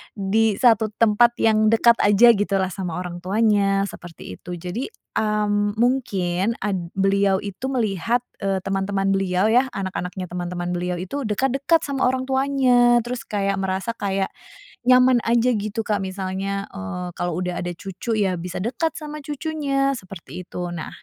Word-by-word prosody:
di 205 +2 +1
1 225 -3 +4
tempat 230 +2 +4
yang 215 -1 +4
dekat 230 +1 +4
aja 205 +4 +6
gitu, 205 -2 0
lah, 190 -1 0
sama 180 -3 -4
orang 180 -1 -5
tuanya, 200 0 +2
seperti 165 - -10
itu. 180 -1 -7
Jadi, 180 +9 -4 0.3
mmm, 205 -1 0
mungkin 220 -5 0
ad 200 -2 0 0.2
beliau 195 0 +2
itu 205 +6 -5
melihat, 235 -1 0 0.2
eee, 195 -1 0
teman-teman 195 0 0
beliau, 195 0 +1
ya, 250 +3 +4
anak-anaknya 190 -1 -4
teman-teman 175 0 -3
beliau 180 0 -2
itu 260 +10 -4
dekat-dekat 270 +9 +1
sama 270 -2 +1
orang 260 0 0
tuanya, 260 -3 +3
terus 245 +1 -5
kayak 200 -1 -1
merasa 190 +3 -2
kayak 195 -2 -1 0.5
nyaman 250 0 +5
aja, 235 +2 +3
gitu, 215 +1 -3
Kak, 210 -2 0
misalnya, 190 +1 -3
eee, 180 - -5
kalau 175 -1 -2
udah 180 -1 -3
ada 175 - -3
cucu, 195 +6 -4
ya, 190 -3 +1
bisa 180 +1 -6
dekat 320 +6 -1
sama 300 -1 -7
cucunya, 280 -2 -1
seperti 185 -5 -9
itu. - - -10 0.2
Nah, 160 - -5
205 Hz, 155 wpm, -22 LUFS, 190-240 Hz, 0.5 s, aja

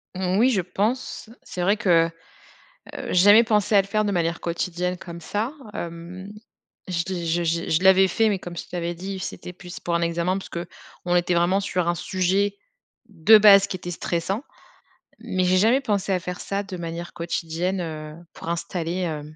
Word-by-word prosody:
Mmh, 185 +1 0
oui, 250 +3 +5
je 200 -7 +2
pense. 215 +6 -2
C'est 180 - -6
vrai 200 +4 +2
que, 170 -5 +4
heu, - - -16 1.0
j'ai - - -1
jamais 205 +5 +7
pensé 210 -1 +1
à 200 - +7
le - - -12
faire 215 +1 0
de 205 - 0
manière 170 -1 0
quotidienne, 180 +1 -2
comme 170 -1 -9
ça. 215 - -2 0.2
Hem, 175 +4 -7 0.6
je 170 -2 -1
l' 175 -2 -3
j 170 +1 0
j 165 +1 -1
je 160 +4 +1
l'avais 190 0 +6
fait, 225 +4 +2
mais 200 - +1
comme 175 -2 -8
je - - -6
t'avais 175 -1 -3
dit, 190 +2 -6
c'était 180 0 -6
plus 180 0 -10
pour 170 -1 -2
un 170 - +1
examen 170 +2 0
parce 195 - -8
qu'on 175 +1 -5
était 175 0 +2
vraiment 175 +3 +3
sur 180 -3 -1
un 175 - +1
sujet, 190 +3 0 0.5
de 205 +4 +6
base 200 -2 +7
qui 185 - -4
était 175 0 -6
stressant. 180 - -2 0.8
Mais 185 0 -1
j'ai 185 +1 +3
jamais 230 +7 +4
pensé 205 -6 -1
à 185 - +2
faire 180 +1 -6
ça 200 0 -2
de 195 -2 -7
manière 170 0 -6
quotidienne, 170 +2 -2
heu, 155 -2 -6 0.2
pour 165 - -8
installer, 170 0 -3
hem 155 -3 -4
180 Hz, 195 wpm, -24 LUFS, 170-195 Hz, 1.0 s, jamais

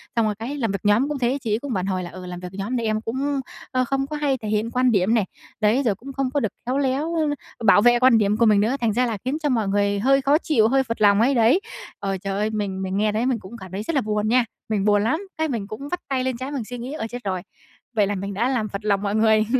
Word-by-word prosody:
Xong 230 - +3
rồi 210 -1 0
cái 235 +7 -5
làm 225 -6 0
việc 195 - -2
nhóm 230 +8 +3
cũng 290 -3 -3
thế, 250 +3 +1
chị 220 - -3
ấy 220 - +1
cũng 275 -3 -4
phản 185 -1 -1
hồi 185 -2 -1
là, 175 - -6
ừ, 185 +1 -9
làm 180 -1 -6
việc 180 - -7
nhóm 205 +6 -3
thì 230 - -2
em 215 0 0
cũng, 270 +5 -2 0.3
ơ, 255 -1 +2
không 270 +1 -1
có 305 - -5
hay 280 -3 +1
thể 220 - -7
hiện 215 +2 0
quan 255 -1 +3
điểm 200 +2 +2
này, 220 -4 +2 0.3
đấy, 220 +5 +3
rồi 205 -4 +2
cũng 270 +3 -10
không 270 -1 -1
có 285 - +2
được 220 - 0 0.2
khéo 255 +3 0
léo 280 +3 0 0.5
bảo 205 -1 +6
vệ 240 +1 +5
quan 255 -3 +6
điểm 210 0 +2
của 230 - +4
mình 210 -2 +5
nữa, 230 +6 +1
thành 220 -3 +1
ra 250 +2 +2
là 225 -3 -2
khiến 270 +4 0
cho 295 - +2
mọi 225 -5 +1
người 200 0 +1
hơi 275 +4 +3
khó 280 +3 +4
chịu, 240 -10 +2
hơi 265 +2 +3
phật 230 -3 -5
lòng 205 +1 +5
ấy, 265 +3 +3
đấy. 235 - +4 0.4
Ờ, 195 -1 -2
trời 195 +1 -4
ơi, 215 +1 +1
mình 200 -3 -3
mình 190 0 -2
nghe 210 +1 +2
thấy 220 +3 0
mình 255 -4 +1
cũng 215 +5 -10
cảm 185 -3 -11
thấy 200 +3 -4
rất 325 - -3
là 270 - +3
buồn 210 0 -1
nha, 245 +1 +3 0.2
mình 205 -2 0
buồn 205 -1 +4
lắm, 310 +10 +1 0.2
cái 315 - 0
mình 220 -6 -3
cũng 275 +7 -7
vắt 355 - -2
tay 260 -1 0
lên 260 -2 -1
trán 265 +3 -5
mình 265 -5 -2
suy 245 +3 -7
nghĩ, 250 +5 -6
ơ, 225 -7 -4
chết 245 0 -7
rồi, 185 -2 -2 0.5
vậy 205 -2 +3
là 205 - -1
mình 200 +1 -4
đã 235 +6 0
làm 220 -5 -1
phật 200 +2 -6
lòng 200 -1 +2
mọi 205 0 -1
người. 220 0 +4
225 Hz, 305 wpm, -23 LUFS, 205-260 Hz, 0.5 s, bảo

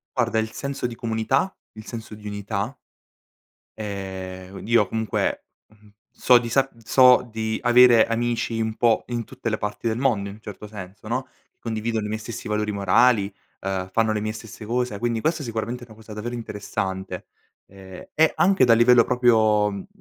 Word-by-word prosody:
Guarda 115 -3 +1
il 110 0 -2
senso 140 -1 -3
di 120 - -7
comunità. 115 - 0 0.2
Il 110 0 -11
senso 115 -2 -7
di 105 0 -10
unità. 105 +4 -3 1.0
Ehm, 95 -2 -6
io 110 -3 +3
comunque, 110 -2 -1 0.2
mhmm, 105 -1 -22 0.2
so 125 -1 +4
di 120 -1 -5
sa 135 +3 +3 0.2
so 125 0 +5
di 110 0 -2
avere 120 -2 +6
amici 115 0 -1
un 110 -1 -1
po' 115 -2 +2
in 120 -1 -2
tutte 125 -1 -5
le 110 - -1
parti 105 +2 -3
del 115 +2 -1
mondo 110 -7 +1
in 100 - -9
un 110 - -18
certo 105 0 -9
senso, 100 0 -10
no, 130 +3 -2 0.3
condividono 110 -1 -2
i - - -2
miei 110 +1 -3
stessi 115 +1 -7
valori 105 0 -1
morali, 100 +1 +3 0.3
uhm, 95 -1 -3
fanno 110 0 +2
le 105 - -1
mie 110 0 -2
stesse 110 -1 -10
cose, 125 -1 -1
quindi 115 +1 -1
questa 160 +1 0
è - - -6
sicuramente 115 +1 -4
una 110 - -15
cosa 110 0 -12
davvero 115 +3 -5
interessante. 100 -4 -4 0.4
Ehm, 95 -1 -12
e 160 +1 +5
anche 190 -8 +4
dal 115 -1 +5
livello 120 0 +6
proprio, 110 -4 +3
mh 100 - -5
mhmm, 100 - -8
110 Hz, 185 wpm, -24 LUFS, 105-120 Hz, 1.0 s, avere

